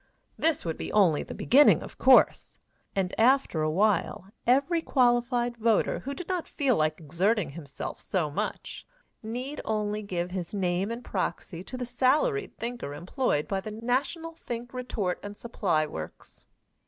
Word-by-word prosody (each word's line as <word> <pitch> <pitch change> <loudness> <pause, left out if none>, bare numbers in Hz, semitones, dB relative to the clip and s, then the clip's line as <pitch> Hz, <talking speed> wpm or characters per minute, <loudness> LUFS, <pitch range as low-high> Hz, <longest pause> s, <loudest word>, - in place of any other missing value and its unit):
This 320 - 0
would 165 -1 -3
only 180 -8 +4
be - - -8
the - - -7
beginning, 285 +4 +5
of - - -11
course, - - +5 0.4
and 190 -2 0
after 250 - +3
a 155 - +1
while 195 +2 +1 0.2
every 280 +7 +3
qualified 240 -3 +2
voter 225 -1 +2
who 280 +1 -5
did 360 - -7
not 365 -3 -2
feel 275 -5 +1
like 155 -1 0
exerting 175 +3 0
himself 140 -3 -7
so 165 -6 -1
much, - - -4 0.4
need 250 +6 -5
only 210 -1 -1
give 180 -3 -3
his 185 +1 -4
name 185 +1 0
and 235 +1 -6
proxy 180 -2 -3
to 255 - -7
the 250 - -3
salaried 290 - +1
thinker 235 -11 -5
employed 175 - -1
by 195 -1 -1
the 215 - -6
National 255 +9 -2
Think 240 -5 -7
Retort 220 -8 -2
and 205 0 -8
Supply 180 -9 0
Works. 80 - -9
220 Hz, 155 wpm, -28 LUFS, 180-255 Hz, 0.4 s, beginning